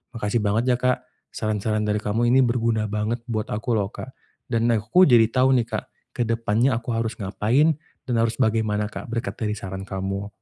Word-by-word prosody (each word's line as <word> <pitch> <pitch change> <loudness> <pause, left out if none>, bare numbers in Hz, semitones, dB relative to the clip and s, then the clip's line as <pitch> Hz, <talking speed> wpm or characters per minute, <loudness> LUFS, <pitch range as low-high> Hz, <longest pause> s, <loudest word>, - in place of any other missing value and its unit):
Makasih 115 0 0
banget 105 +2 +1
ya - - -4
Kak 125 0 +1 0.2
saran-saran 110 0 -2
dari 105 0 0
kamu 115 +3 +1
ini 130 - +5
berguna 115 -3 +1
banget 105 +3 -2
buat 110 -2 -3
aku 110 +4 -4
loh 100 -1 -1
Kak. 130 - -9 0.3
Dan 115 -2 +1
aku 115 - +4
jadi 120 -8 +6
tahu 130 +3 +3
nih 115 - -2
Kak - - -4 0.3
ke 120 - +1
depannya 115 +2 +1
aku 115 +1 -4
harus 115 0 -1
ngapain 120 +10 +2 0.3
dan 125 - -1
harus 115 0 +1
bagaimana 105 -2 +1
Kak - - -7
berkat 115 -4 -3
dari 105 -2 -1
saran 95 -2 -6
kamu. 95 +1 -4
110 Hz, 190 wpm, -23 LUFS, 105-120 Hz, 0.3 s, jadi